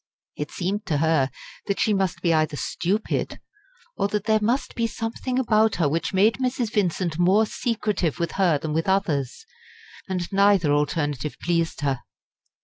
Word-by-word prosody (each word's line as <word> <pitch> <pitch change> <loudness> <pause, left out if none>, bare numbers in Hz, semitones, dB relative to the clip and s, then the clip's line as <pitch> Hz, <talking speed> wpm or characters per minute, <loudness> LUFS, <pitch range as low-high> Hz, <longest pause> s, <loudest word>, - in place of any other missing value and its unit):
It 150 0 -4
seemed 195 +3 -3
to 155 -5 +1
her 155 -3 +2 0.4
that 200 - -1
she 215 - +2
must 185 -3 -1
be 170 -2 +3
either 155 -1 +1
stupid, 200 +9 -2 0.6
or - - 0
that 205 -1 -2
there 220 0 +3
must 240 +6 0
be 230 -1 0
something 225 +3 -3
about 220 -4 +3
her 165 - +2
which 160 +4 -1
made 205 +4 +3
Mrs. 245 -3 -1
Vincent 175 -4 0
more 190 +5 +4
secretive 210 - -1
with 170 -1 -2
her 180 -6 +2
than 150 +1 -4
with 165 +4 0
others; 165 - 0 0.6
and 180 -2 -2
neither 195 -6 +4
alternative 145 -1 -1
pleased 170 -2 0
her. 135 -3 -1
185 Hz, 160 wpm, -24 LUFS, 160-210 Hz, 0.6 s, more